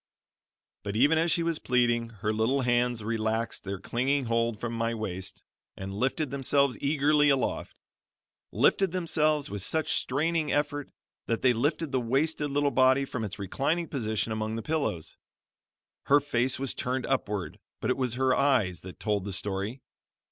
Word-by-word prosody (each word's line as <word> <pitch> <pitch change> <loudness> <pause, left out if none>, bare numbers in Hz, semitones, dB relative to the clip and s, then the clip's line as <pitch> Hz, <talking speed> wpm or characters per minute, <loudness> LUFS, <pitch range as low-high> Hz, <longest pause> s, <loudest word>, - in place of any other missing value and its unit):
But 100 0 -5
even 145 +8 +4
as 165 +1 +2
she 170 - +2
was 165 -1 -1
pleading, 120 -2 +1 0.2
her 110 - +2
little 115 +6 +1
hands 120 -2 +1
relaxed 110 +1 -2
their 100 0 -4
clinging 130 +7 0
hold 115 -1 0
from 120 0 -3
my 115 0 -1
waist, 95 -4 -5 0.3
and 95 0 -6
lifted 130 +6 -1
themselves 140 -1 +2
eagerly 145 +1 +3
aloft; 135 -2 0 0.8
lifted 195 -3 +3
themselves 155 - +1
with 100 -1 -3
such 160 - -1
straining 155 +4 0
effort, 145 -1 -1 0.4
that 115 - -1
they 125 -1 +5
lifted 145 +5 -1
the 130 -2 +1
wasted 145 +5 0
little 145 0 +1
body 130 +1 +4
from 125 -3 -4
its 105 -2 -5
reclining 140 - -1
position 110 -4 -2
among 110 0 -2
the 115 - -4
pillows. 140 - -2 0.9
Her 145 +1 +6
face 130 -3 0
was 135 -1 -3
turned 130 +1 -2
upward, 105 - -2 0.2
but 120 - 0
it - - 0
was 125 -3 -1
her 130 0 +2
eyes 120 -12 +2
that 95 0 -10
told 105 -3 0
the 100 - -5
story. 100 +6 -3
125 Hz, 160 wpm, -28 LUFS, 110-145 Hz, 0.9 s, Her